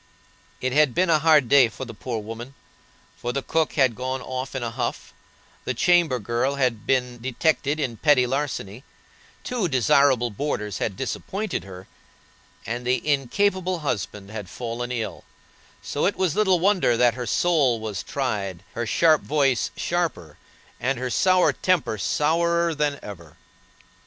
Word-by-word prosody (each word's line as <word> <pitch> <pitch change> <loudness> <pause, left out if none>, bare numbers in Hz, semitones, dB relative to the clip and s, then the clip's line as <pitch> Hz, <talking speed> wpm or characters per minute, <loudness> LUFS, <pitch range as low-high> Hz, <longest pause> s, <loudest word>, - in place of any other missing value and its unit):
It 130 0 -1
had 150 -3 +3
been 180 -1 +2
a 155 - +4
hard 155 -4 +4
day 135 -2 +6
for 120 +5 -7
the 115 - -9
poor 115 +2 -5
woman, 115 +5 -7 0.6
for 120 - -4
the 135 +1 -3
cook 160 -1 0
had 130 -4 +3
gone 130 +3 -3
off 130 +1 -5
in 130 - -2
a 115 - -3
huff; 125 +1 -4 0.5
the 130 - -3
chamber 170 -1 +3
girl 120 +5 -1 0.3
been 125 -2 0
detected 145 +3 0
in 125 -6 -2
petty 145 -3 +4
larceny; 130 -4 -3 0.6
two 240 -7 -1
desirable 130 -3 +3
boarders 105 -4 -3
had 100 -4 -2
disappointed 195 - -3
her; 95 -1 -10 0.8
and 120 +3 -4
the 130 +4 0
incapable 180 +6 +1
husband 105 -6 -4
had 105 -4 -7
fallen 120 +3 -5
ill, 115 -3 -4 0.6
so 145 - 0
it 200 - 0
was 185 -5 0
little 190 -4 +3
wonder 180 - +3
that 120 -1 +4
her 125 -1 -5
soul 140 -5 +2
was 110 -2 -4
tried, 100 -9 -3
her 120 0 -3
sharp 160 +4 +4
voice 140 -5 +1
sharper, 160 - -2 0.4
and 130 +3 0
her 125 0 -3
sour 185 +4 +3
temper 170 - 0
sourer 170 - +1
than 150 -1 -1
ever. 85 -7 -10
130 Hz, 150 wpm, -24 LUFS, 115-155 Hz, 0.8 s, day